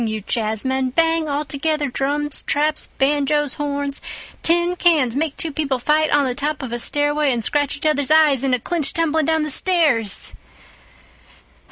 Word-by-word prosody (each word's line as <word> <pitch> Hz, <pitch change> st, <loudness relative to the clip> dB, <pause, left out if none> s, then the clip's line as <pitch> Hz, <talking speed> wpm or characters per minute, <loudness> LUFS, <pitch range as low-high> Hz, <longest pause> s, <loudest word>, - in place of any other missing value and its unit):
you 220 Hz, 0 st, -3 dB
jazzmen, 245 Hz, +5 st, -1 dB
bang 325 Hz, -1 st, +1 dB
altogether 295 Hz, +1 st, -2 dB
drums, 290 Hz, +3 st, -1 dB
traps, 300 Hz, +1 st, -1 dB
banjoes, 290 Hz, +1 st, 0 dB
horns, 285 Hz, -1 st, -1 dB, 0.4 s
tin 345 Hz, +1 st, +2 dB
cans—make 305 Hz, -4 st, +1 dB
two 325 Hz, -, -2 dB
people 280 Hz, -3 st, -2 dB
fight 305 Hz, +5 st, +1 dB
on 290 Hz, -1 st, +2 dB
the 255 Hz, -, -2 dB
top 290 Hz, +2 st, -3 dB
of 245 Hz, -2 st, -6 dB
a 240 Hz, -, -2 dB
stairway 290 Hz, +2 st, +1 dB
and 235 Hz, -2 st, -1 dB
scratch 290 Hz, +1 st, -1 dB
each 285 Hz, -, -6 dB
other's 295 Hz, -3 st, +1 dB
eyes 305 Hz, -4 st, +4 dB
in 270 Hz, -, 0 dB
a 250 Hz, -, +1 dB
clinch 320 Hz, +4 st, +1 dB
tumbling 320 Hz, -2 st, 0 dB
down 320 Hz, -1 st, +1 dB
the 305 Hz, -, -1 dB
stairs. 285 Hz, -, +2 dB
290 Hz, 160 wpm, -19 LUFS, 270-310 Hz, 0.4 s, eyes